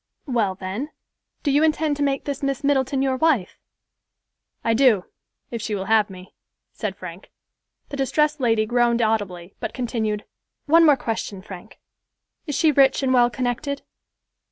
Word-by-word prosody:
"Well 225 -8 0
then, 195 +10 -5 0.5
do 285 - +1
you 285 +2 +4
intend 310 -1 +2
to - - -4
make 275 -1 0
this 280 -1 -4
Miss 275 -1 -2
Middleton 270 -1 +1
your 265 -1 +1
wife?" 265 - +1 1.0
"I 230 - +2
do, 225 -6 +4 0.5
if 235 -2 -4
she 210 - -2
will 190 -1 -4
have 220 -1 +3
me," 185 0 -12 0.4
said 210 -4 -4
Frank. 180 0 -10 0.6
The 280 - -5
distressed 300 +2 +1
lady 225 -4 +2
groaned 240 0 +2
audibly, 195 -5 -2
but - - -5
continued, 225 -4 -2 0.4
"One 330 +2 +6
more 290 -2 +6
question, 220 -5 -4
Frank. 195 +1 -11 0.7
Is 295 - -2
she 320 -2 +4
rich 275 -1 +4
and 260 -1 +2
well 240 -1 +5
connected?" 255 +3 -3
245 Hz, 155 wpm, -23 LUFS, 210-280 Hz, 1.0 s, One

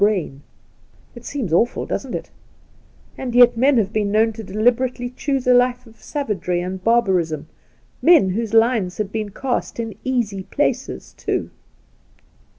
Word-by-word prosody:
brain!. 185 -9 +1 0.7
It 240 0 -12
seems 245 - -3
awful, 230 +8 +2
doesn't - - -4
it - - -6 0.9
1 - - -7
and 240 - -4
yet 245 -1 +7
men 260 +3 +3
have 210 -2 0
been 210 -2 0
known 220 +1 +3
to 225 - -8
deliberately 245 +4 0
choose 270 0 -2
a 250 - +5
life 250 0 +2
of 225 -1 -19
savagery 195 - -2
and 185 +1 -5
barbarism 185 -10 +1 0.3
— 120 +1 -37
men 275 - +6
whose 220 +2 -2
lines 225 -5 +2
had 210 -2 -3
been 215 -1 -3
cast 245 +3 -3
in 225 -2 -3
easy 235 -7 -1
places, 260 +4 -2
too - - -3
225 Hz, 155 wpm, -21 LUFS, 195-245 Hz, 0.9 s, yet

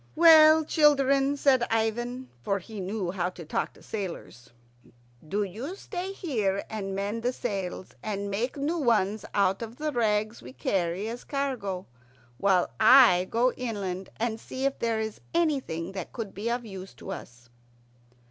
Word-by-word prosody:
"Well, 315 -1 +8
children," 280 -2 +3
said 270 -3 +4
Ivan, 240 +3 -1
for 195 +9 0
he 205 +3 -9
knew 190 -1 -2
how 180 -1 -1
to 180 -2 -10
talk - - -2
to - - -19
sailors, 175 - -6 0.8
"do 205 +4 0
you 230 - -6
stay 380 -1 -5
here 220 - -1
and 195 -3 -4
mend 205 +3 -2
the 245 +2 +1
sails, 195 -7 -4
and 200 -1 -3
make 235 +8 -2
new 310 +5 -1
ones 220 -6 +1
out 195 0 +2
of 230 0 -6
the 305 +3 -2
rags 215 -3 0
we 125 +1 -11
carry 175 - -1
as 235 +2 -6
cargo, 245 -10 -3 0.5
while 190 -3 +3
I 220 -6 +7
go 245 +2 +2
inland 195 -6 -4
and 225 -1 -2
see 260 +4 -5
if 275 - 0
there 230 -1 0
is 220 -1 -4
anything 270 - 0
that 190 -3 -6
could 225 -5 -5
be 210 +4 -3
of 240 0 -2
use 190 - -9
to - - -8
us." 120 0 -9
220 Hz, 160 wpm, -27 LUFS, 195-260 Hz, 0.8 s, Well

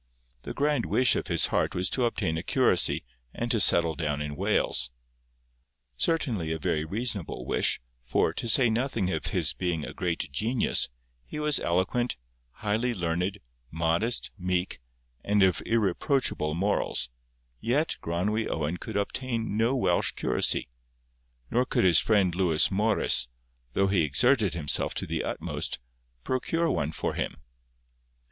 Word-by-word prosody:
The - - -7
grand 145 -3 +1
wish 130 0 +3
of - - -2
his - - +4
heart - - +1
was 90 0 0
to 125 - +1
obtain 105 -8 -1
a 80 - -2
curacy, - - +2 0.3
and 120 0 -2
to 115 - +2
settle 85 -4 +5
down 75 -3 -2
in 75 0 -4
Wales. 65 -2 +1 1.1
Certainly 110 - 0
a 80 - -1
very 75 0 -1
reasonable 100 - -3
wish, - - +1 0.2
for, 60 - +1
to 115 - -3
say 125 +2 +5
nothing 115 -4 0
of 80 - -2
his - - 0
being 85 -4 -2
a - - -8
great 85 -5 -3
genius, 110 - +1 0.4
he - - -7
was 150 -1 +1
eloquent, 95 - 0 0.3
highly 110 - -1
learned, 90 +1 -2 0.3
modest, 85 - 0
meek, 90 0 -1 0.4
and 105 -1 +3
of 95 -2 +3
irreproachable 110 - 0
morals; 95 -8 0 0.5
yet 145 - 0
Gronwy 105 +7 -1
Owen 80 +2 -2
could 100 - -5
obtain 115 +1 -2
no 115 +4 +2
Welsh 130 - +1
curacy, - - +1 0.8
nor 125 +2 +3
could 130 - 0
his 90 -3 +6
friend 100 -5 +2
Lewis 85 -4 +3
Morris, 95 - +2 0.5
though 100 - +2
he 95 -2 +2
exerted 100 - +2
himself 75 -4 0
to - - -2
the - - -2
utmost, - - -3 0.5
procure 165 +6 0
one 80 -2 -1
for - - -3
him. - - -3
95 Hz, 145 wpm, -27 LUFS, 80-120 Hz, 1.1 s, his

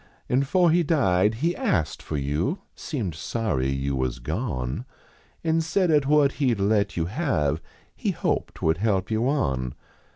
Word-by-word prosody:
An 130 +2 +2
fore 170 +5 +3
he 175 +2 +4
died 110 - +2
he 175 +1 +2
ast 105 - 0
for 75 - -4
you 75 - -1
Seemed 115 - -3
sorry 80 - -1
you 70 0 -1
was 65 -1 -1
gone, 75 - -3 0.6
An 165 0 +2
said 175 +2 +1
at 145 -3 +3
what 145 -1 +4
he 125 -4 +3
d 100 - -2
let 100 -1 +1
yon 80 - +1
have 85 - 0 0.3
He - - -2
hoped - - -2
would 80 +2 +2
help 100 -1 0
you 110 +4 +1
on." 65 - 0
105 Hz, 165 wpm, -25 LUFS, -, 0.6 s, he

